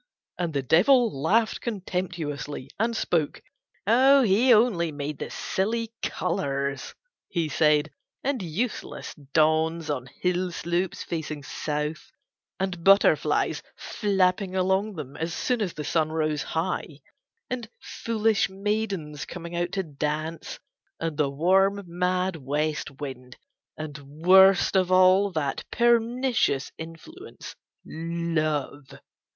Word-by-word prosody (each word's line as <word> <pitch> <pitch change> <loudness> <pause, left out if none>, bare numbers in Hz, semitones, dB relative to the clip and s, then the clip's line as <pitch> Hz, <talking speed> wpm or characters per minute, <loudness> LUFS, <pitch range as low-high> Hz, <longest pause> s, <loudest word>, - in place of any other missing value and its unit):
And 170 -4 -2
the 140 - 0
Devil 225 - +4
laughed 220 +8 +2
contemptuously 175 - -4
and 230 +1 0
spoke. 160 -7 -1 0.4
"He 250 -1 +5
only 210 -8 +4
made 145 0 -5
the - - -4
silly 225 +4 -2
colors," 140 -6 -2 0.3
he 170 -3 -1
said, 150 0 +2 0.3
"and 270 -4 -1
useless 190 +8 -4
dawns 155 +2 +1
on 130 -3 -3
hill 180 +6 -1
slopes 175 +2 -2
facing 155 -3 -5
South, 150 +2 -4 0.5
and 185 -3 -3
butterflies 195 +2 +4 0.2
flapping 190 -2 0
along 190 +3 +1
them 145 -3 -7
as 165 +1 -3
soon 250 -3 0
as 185 -5 -1
the 150 - -4
sun 155 +1 0
rose 155 -2 0
high, 160 -3 -3 0.5
and 245 -3 -5
foolish 225 -3 0
maidens 195 -7 -3
coming 170 -1 -7
out 175 0 -1
to 195 - 0
dance, 155 +1 -4 0.4
and 165 -2 -2
the 145 -2 +1
warm 190 +7 +2
mad 180 +1 -1
West 150 +2 -2
wind, 130 -3 -7 0.4
and 150 -1 -6
worst 180 +8 +5
of 185 -1 +2
all 185 +2 +5
that 145 -4 -2
pernicious 235 - +2
influence 165 - -10 0.3
Love." 155 -4 -2
170 Hz, 115 wpm, -26 LUFS, 150-195 Hz, 0.5 s, He